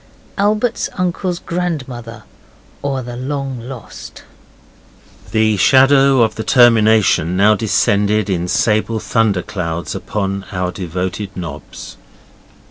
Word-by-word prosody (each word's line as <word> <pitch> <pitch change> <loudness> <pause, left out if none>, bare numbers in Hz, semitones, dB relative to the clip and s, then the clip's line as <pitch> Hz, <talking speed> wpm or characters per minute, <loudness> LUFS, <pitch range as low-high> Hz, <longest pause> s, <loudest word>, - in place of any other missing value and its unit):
ALBERT'S 215 +3 0
UNCLE's 180 0 -1
GRANDMOTHER; 130 -12 -5 0.6
OR, 135 -2 -2
THE 120 0 -7
LONG 135 0 -4
LOST 125 -1 -10 1.1
The 110 -1 +2
shadow 135 +6 +5
of 110 -1 0
the 110 - -5
termination 110 -8 +4
now 105 +2 +5
descended 105 0 +1
in 90 -3 -1
sable 110 +3 +1
thunder 105 -5 0
clouds 85 -3 -4
upon 100 -2 -4
our 90 -2 -2
devoted 95 +3 -5
nobs. 80 -5 -8
110 Hz, 105 wpm, -17 LUFS, 95-135 Hz, 1.1 s, shadow